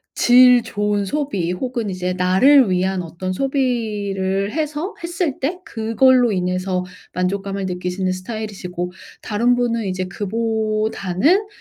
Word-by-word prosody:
질 250 0 +6
좋은 205 -1 -1
소비 200 - -2
혹은 235 +1 -3
이제 180 -1 -2
나를 190 +8 +5
위한 185 +1 0
어떤 170 +3 -5
소비를 210 -7 -1
해서 310 - -3
했을 340 -4 -2
때 340 +7 -2
그걸로 235 +1 +3
인해서 180 0 -1 0.3
만족감을 195 +1 -2
느끼시는 180 +1 -2
스타일이시고 185 -3 -5 0.3
다른 235 +4 +1
분은 235 -2 0
이제 185 -1 -2
그보다는 215 - 0
210 Hz, 275 characters per minute, -20 LUFS, 185-245 Hz, 0.3 s, 질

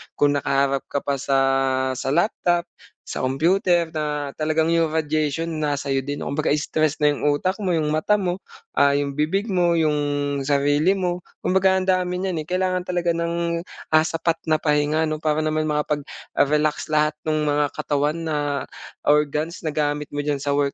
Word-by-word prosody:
kung 145 0 +3
nakaharap 140 0 +1
ka 140 - -1
pa 140 -1 -1
sa 135 +1 +1 0.6
sa 130 - -4
laptop, 175 -1 +1 0.4
sa - - -4
computer 170 - +2
na 150 -2 -2
talagang 155 +1 0
'yong 165 -1 +2
radiation 155 0 0 0.2
nasa'yo 140 -2 0
din 145 +2 -5
kumbaga 150 +2 -1
stress 155 0 0
na 150 -1 +3
'yong 145 0 +1
utak 185 +5 0
mo, 190 - -1
'yong 155 -2 0
mata 155 +7 +2
mo, 185 -1 -2 0.3
ah, 140 0 +4
'yong 140 -1 -1
bibig 160 +8 0
mo, 175 -5 +2
'yong 155 -2 +2 0.4
sarili 145 +6 +2
mo. 180 -1 -1 0.2
Kumbaga 190 0 +3
ang 185 - -1
dami 180 -1 +1
n'yan 180 -3 -2
eh, - - -9
kailangan 185 0 0
talaga 175 -1 -1
ng, 170 0 -1 0.3
ah, 155 - +7
sapat 165 +1 -1
na 155 - +4
pahinga 150 +1 +1
'no? 155 -1 -3
Para 155 0 +1
naman 155 0 0
makapag-relax 150 0 -1
lahat 150 0 +2 0.2
no'ng 155 -1 +1
mga 145 0 +2
katawan 145 +2 0
na 155 -2 -1 0.7
organs 150 +3 +1
na 160 - -2
gamit 150 -1 -1
mo 145 0 -4
d'yan 145 -2 -1
sa 140 0 0
work 140 -1 +1
155 Hz, 170 wpm, -23 LUFS, 145-170 Hz, 0.7 s, ah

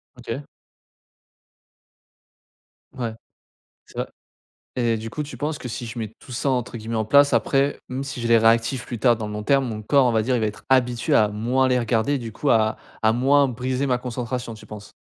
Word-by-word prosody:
OK. 125 +3 -6 2.5
Ouais, 120 -3 -3 0.7
ça - - -5 0.7
et 120 -2 +1
du 110 +1 -6
coup, 150 - -4
tu 145 -3 -8
penses 150 +4 -3
que 125 - -6
si 120 +1 -5
je 115 - -8
mets 110 -1 -5
tout - - -12
ça 130 +3 0
entre 125 -2 -2
guillemets 115 +1 -4
«en 110 - 0
place», 140 +5 +5
après, 140 +1 +2
même 130 +1 -3
si 140 -2 -6
je 120 - -2
les 115 0 +6
réactives 115 +3 +2
plus 120 - -6
tard, 120 +1 +4
dans 110 -1 -5
le - - -6
long 105 0 -5
terme, 135 +3 +3
mon 110 -2 -5
corps, 140 +5 +4
on 125 - +3
va 110 -1 +2
dire, 125 +4 0
il 120 - +1
va 110 - +1
être 105 -1 -6
habitué 130 +2 +2
à 110 -6 +5
moins 120 +6 +1
les 125 -1 +3
regarder 120 +3 +1
et - - 0
du 115 -3 -7
coup, 140 +6 -1
à 110 -1 +3 0.2
à 110 0 +3
moins 140 +4 +4
briser 130 +2 -2
ma 125 -2 +1
concentration, 125 -1 -4
tu 110 0 -13
penses? 105 -1 -10
120 Hz, 215 wpm, -23 LUFS, 110-130 Hz, 2.5 s, les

